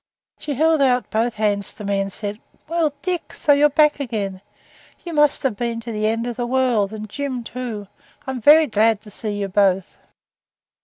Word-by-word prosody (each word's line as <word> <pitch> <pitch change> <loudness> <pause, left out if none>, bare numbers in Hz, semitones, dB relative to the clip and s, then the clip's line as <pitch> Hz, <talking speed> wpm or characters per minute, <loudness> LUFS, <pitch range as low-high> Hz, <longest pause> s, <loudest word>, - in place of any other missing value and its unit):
She 290 -2 -4
held 315 +2 +3
out 250 -2 +2
both 230 +1 0
hands 205 -2 -1
to 210 - -9
me 200 -1 0
and 195 0 -2
said 205 +2 -5 0.3
'Well, 330 -1 +1
Dick, 360 -2 -3
so 290 - +3
you're 290 +1 +5
back 300 +1 +3
again. 205 -8 -3 0.6
You 340 - -5
must 295 -2 +3
have 260 -6 0
been 235 +1 -2
to 230 +1 -6
the 215 -1 -1
end 230 +1 -1
of 240 -1 -4
the 240 -1 -2
world, 245 -6 +1
and 215 0 -6
Jim, 260 +2 -4
too. 230 -4 -6 0.4
I'm 265 -2 -4
very 310 +6 +7
glad 220 -3 +2
to 210 - -14
see 210 +1 -5
you 200 - -1
both.' 190 -1 +1
235 Hz, 195 wpm, -21 LUFS, 210-280 Hz, 0.6 s, very